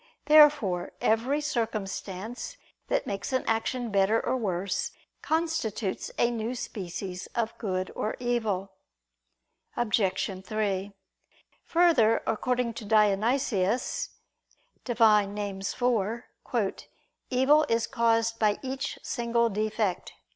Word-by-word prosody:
Therefore 290 -12 +5
every 245 +7 +1
circumstance 220 -4 -4 0.3
that - - 0
makes 200 +5 -4
an 260 - +1
action 230 +1 -1
better 200 +3 +3
or 255 - -1
worse, 195 -5 -1 0.3
constitutes 315 - -1
a 240 - +3
new 230 +1 -3
species 185 -4 -5
of 230 -1 -1
good 185 -4 -2
or 215 - -2
evil. 220 -6 -1 1.1
Obj. 195 -4 0
3: 205 -2 -2 0.7
Further, 315 -11 +4
according 240 +1 0
to 225 - -7
Dionysius 215 +1 +1 0.8
(Div. 240 -2 -3
Nom. 210 -2 +5
iv), 210 +2 -2 0.6
"evil 270 +4 +4
is 230 0 +2
caused 230 -2 +1
by 210 -2 +3
each 265 +1 -3
single 235 -1 +1
defect." 215 -2 -1
225 Hz, 100 wpm, -28 LUFS, 200-245 Hz, 1.1 s, Therefore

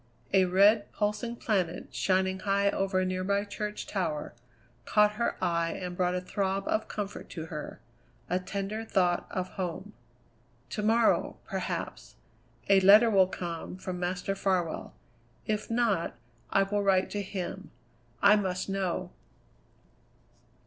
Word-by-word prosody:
A 190 -1 +5
red, 200 +4 +4
pulsing 215 +3 -1
planet, 190 -8 -1
shining 190 0 +1
high 200 0 +2
over 195 -1 0
a - - +1
nearby 185 +2 0
church 210 +1 -5
tower, 165 -7 -3 0.5
caught 210 - +4
her 225 +3 -1
eye 170 -1 +1
and 180 -1 -5
brought 180 0 +1
a 180 - -1
throb 195 +1 -2
of 215 - 0
comfort 205 -1 -5
to 160 -3 -6
her 150 - -6 0.5
a 180 - 0
tender 200 +3 -4
thought 180 -5 +1
of 185 -1 -3
home. 180 -4 -5 0.8
"To - - -2
morrow, 225 +2 +2
perhaps, - - -4 0.5
a 195 -1 +6
letter 210 +4 +7
will 190 -3 +5
come 175 -1 -5
from 185 -1 -5
Master 180 +2 -2
Farwell; 185 -4 -1 0.5
if 215 -1 -2
not, 230 -7 +1 0.3
I 195 - +3
will 205 +1 -1
write 195 -2 +2
to 205 - -2
him. 195 0 -5 0.5
I 210 +1 +7
must 185 -2 -2
know." 185 -2 -2
195 Hz, 135 wpm, -29 LUFS, 180-205 Hz, 0.8 s, letter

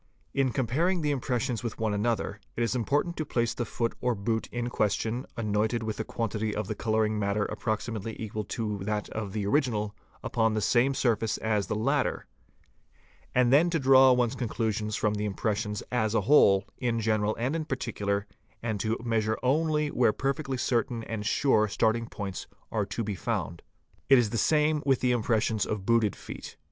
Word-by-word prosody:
| - - -39
In 130 -2 +1
comparing 155 +9 +1
the 150 - +1
impressions 125 -3 -1
with 115 -3 -4
one 110 -2 0
another, 105 -1 -1 0.2
it 120 - 0
is 115 - 0
important 145 +8 0
to 155 - -1
place 120 -5 0
the 120 - -3
foot 115 +1 -2
or 125 -1 +1
boot 110 +3 -1
in 120 0 -2
question, 115 +2 -1
anointed 110 +1 0
with 110 0 -4
a - - 0
quantity 110 -1 -2
of 105 -2 -2
the - - -2
colour 110 -1 +1
ing 105 0 -1
matter 100 0 0
approximately 110 -1 -3
equal 110 -1 -4
to 105 +1 -3
that 105 +2 -2
of 110 -3 -4
the 105 0 -2
original, 105 -4 0 0.3
upon 110 -2 +1
the - - +1
same 125 +5 +2
surface 115 -3 +1
as 105 -2 0
the - - -1
latter; 135 +6 0 1.1
and 125 0 +4
then 160 +5 +5
to 170 - +1
draw 130 -2 +6
one's 125 -1 +2
conclusions 110 -4 -2
from 105 - +1
the 105 0 -2
impression 105 +1 -1 0.2
as 110 -3 +1
a 110 - +3
whole, 100 -5 +5
in 120 -2 0
general 110 -1 +1
and 130 +6 -1
in 165 - -1
particular, 105 -7 -2 0.4
and 110 -3 -2
to 110 +3 0
measure 110 -2 0
only 150 +3 +2
where 120 -3 +3
perfectly 135 +2 -2
certain 120 -1 0
and 110 -2 -4
sure 110 -6 +3
starting 115 +3 +1
points 95 -4 -6 0.2
are - - 0
to 115 - -3
be 105 -1 -2
found. 95 -4 -3 0.5
It 135 - +8
is 120 -4 +2
the 115 - 0
same 150 +3 +3
with 135 -2 +2
the 125 - +2
impressions 110 -2 +1
of 105 -3 -3
booted 115 -3 +3
feet. - - -9
115 Hz, 190 wpm, -28 LUFS, 105-125 Hz, 1.1 s, It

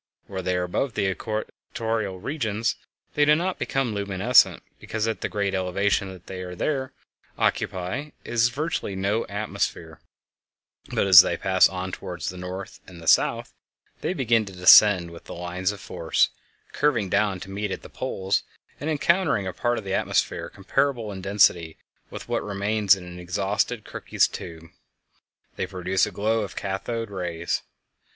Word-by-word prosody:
While 95 -1 -5
they 90 0 -1
are 90 - 0
above 110 +8 -2
the 100 - +1
equatorial 110 -1 -4
regions 115 -3 -1 0.4
they 150 - +3
do 150 +1 +6
not 180 +3 -2
become 135 -5 -1
luminescent, 100 +4 +3 0.2
because 110 0 -3
at 115 - -2
the - - -2
great 100 -2 -1
elevation 95 +1 0
that 90 -2 -13
they 95 -1 -6
there 135 - -1 0.5
occupy 95 +10 -1
there 150 - -18
is 120 +1 +2
virtually 145 -7 -3
no 100 +4 0
atmosphere; 100 -5 -3 0.9
but - - +1
as 95 -2 +11
they 85 - -1
pass 95 +1 +4
on 95 0 -4
toward 90 -2 -7
the 90 - -3
north 90 +2 -7
and 90 -2 -12
the 80 - -11
south - - +3 0.5
they 185 - -2
begin 115 -6 +2
to 95 - -10
descend 90 -1 +7
with 85 - -12
the - - -8
lines 90 +2 -2
of 105 - -9
force, 85 -3 +1 0.4
curving 140 -9 +1
down 100 0 +1
to 95 - -8
meet 105 +1 -3
at - - -5
the - - -9
poles; 95 +1 -1 0.4
and, 150 - -3
encountering 160 - +2
a 95 - -4
part 120 +6 0
of 110 - -4
the 95 -1 -4
atmosphere - - 0
comparable 120 +2 -1
in 95 -1 -7
density 90 -4 +2 0.3
with - - -8
what - - -1
remains 100 0 +2
in 95 - -10
an 90 0 -9
exhausted 100 +5 -1
Crookes - - 0
tube, 80 0 -9 0.9
they - - -2
produce 95 +1 0
a - - -6
glow 110 +2 0
of 100 -3 -6
cathode 105 +3 -3
rays. 85 -3 -2
100 Hz, 165 wpm, -25 LUFS, 90-115 Hz, 0.9 s, as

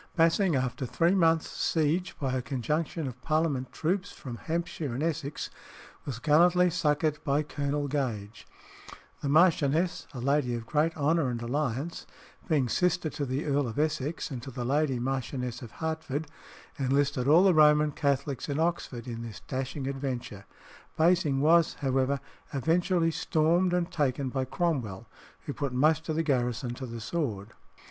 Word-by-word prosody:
Basing, 165 +1 +3
after 130 0 -1
three 170 +8 +2
months' 165 -4 +3
siege 165 +3 0
by 135 -3 -1
a 130 - 0
conjunction 150 +5 -2
of 125 -1 -8
Parliament 155 -4 0
troops 180 +5 -1
from 125 -3 -8
Hampshire 165 -5 -3
and 140 - -2
Essex, 155 -3 -3 0.6
was 130 -5 -3
gallantly 175 +6 +4
succoured 155 -2 0
by 145 0 +1
Colonel 145 0 -2
Gage. 115 -7 -3 0.7
The 140 - -2
Marchioness, 160 +1 +3
a 130 - -7
lady 135 -1 +1
of 115 -1 -5
great 155 +5 +1
honour 150 -1 +2
and 120 -1 -3
alliance, 140 +5 -2 0.4
being 150 -7 +2
sister 175 +3 +1
to 145 - -3
the 130 +4 -2
Earl 145 -2 +1
of 110 - -6
Essex 155 0 -1
and 125 -3 -5
to 125 - -8
the 125 -1 -5
lady 140 0 +1
Marchioness 125 -1 -3
of 120 - -8
Hertford, 160 -2 -3 0.5
enlisted 135 -1 +1
all 160 +5 +7
the 195 -2 +5
Roman 150 -1 +5
Catholics 140 -1 -1
in 145 +1 -1
Oxford 160 -8 -1
in 115 -1 -5
this 115 -5 -8
dashing 135 +1 -4
adventure. 130 -7 -4 0.5
Basing 160 -5 +3
was, 165 +2 +4
however, 135 0 0 0.3
eventually 165 +4 +1
stormed 165 +4 +2
and 175 0 0
taken 140 -3 0
by 130 0 -1
Cromwell, 130 - -2 0.4
who 145 - -5
put 140 -3 -3
most 155 +5 +2
of 155 - 0
the 165 - +1
garrison 125 -4 0
to 130 +1 -6
the 115 -1 -7
sword. 115 -7 -3
145 Hz, 155 wpm, -29 LUFS, 130-160 Hz, 0.7 s, all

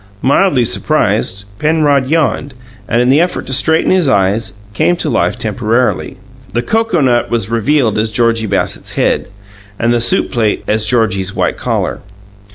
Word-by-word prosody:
Mildly 140 -1 +3
surprised, 105 -7 0
Penrod 150 -4 +2
yawned, 145 -3 0 0.3
and, 120 +2 +1
in 125 - +1
the 140 +4 +4
effort 175 +1 -2
to 130 - -3
straighten 160 +5 +2
his 180 -6 +2
eyes, 100 0 +1 0.2
came 175 - +2
to 160 -4 -3
life 120 - 0
temporarily. 120 +1 -1 0.4
The 120 - -1
cocoanut 160 - +1
was 115 -2 -1
revealed 115 -1 +1
as 110 +1 0
Georgie 115 0 0
Bassett's 100 - -2
head, - - 0 0.5
and 120 +1 +1
the 120 - +1
soup 120 - +1
plate 110 -3 0
as 110 0 0
Georgie's 100 -5 0
white - - 0
collar. - - -2
120 Hz, 155 wpm, -14 LUFS, 110-145 Hz, 0.5 s, the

